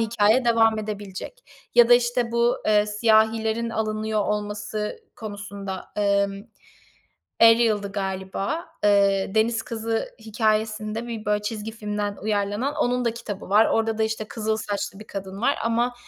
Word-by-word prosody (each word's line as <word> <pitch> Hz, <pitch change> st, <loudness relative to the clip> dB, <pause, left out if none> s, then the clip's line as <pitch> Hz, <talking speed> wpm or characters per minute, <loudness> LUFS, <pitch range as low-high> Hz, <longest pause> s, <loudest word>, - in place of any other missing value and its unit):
hikâye 225 Hz, +2 st, +3 dB
devam 225 Hz, -2 st, +4 dB
edebilecek 210 Hz, -, -7 dB, 0.3 s
ya 240 Hz, -1 st, +7 dB
da, 245 Hz, -, +9 dB
işte, 240 Hz, -1 st, +1 dB
bu, 235 Hz, +1 st, +2 dB
eee, 210 Hz, -1 st, +4 dB
siyahilerin 220 Hz, +1 st, +2 dB
alınıyor 215 Hz, -1 st, -1 dB
olması 210 Hz, -, -3 dB, 0.2 s
konusunda. 200 Hz, -3 st, -7 dB
Emm, 200 Hz, 0 st, +1 dB, 1.0 s
Eliale'dı 225 Hz, -3 st, +5 dB
galiba. 195 Hz, -, -3 dB, 0.2 s
Eee, 200 Hz, -1 st, +3 dB
deniz 225 Hz, +1 st, +2 dB
kızı 225 Hz, 0 st, -3 dB
hikâyesinde, 215 Hz, 0 st, -1 dB
bir, 225 Hz, -2 st, -5 dB
böyle, 210 Hz, 0 st, 0 dB
çizgi 215 Hz, +1 st, -4 dB
filmden 210 Hz, -2 st, -3 dB
uyarlanan, 210 Hz, +6 st, -1 dB
onun 250 Hz, 0 st, +1 dB
da 230 Hz, -1 st, 0 dB
kitabı 210 Hz, -5 st, -7 dB
var. 210 Hz, +2 st, +6 dB
Orada 225 Hz, 0 st, 0 dB
da, -, -, +2 dB
işte, 220 Hz, 0 st, -2 dB
kızıl 220 Hz, 0 st, -2 dB
saçlı 205 Hz, -1 st, -4 dB
bir 215 Hz, -, -11 dB
kadın 195 Hz, -1 st, -7 dB
var 275 Hz, -, +2 dB
ama 235 Hz, +2 st, +1 dB
215 Hz, 140 wpm, -24 LUFS, 205-230 Hz, 1.0 s, da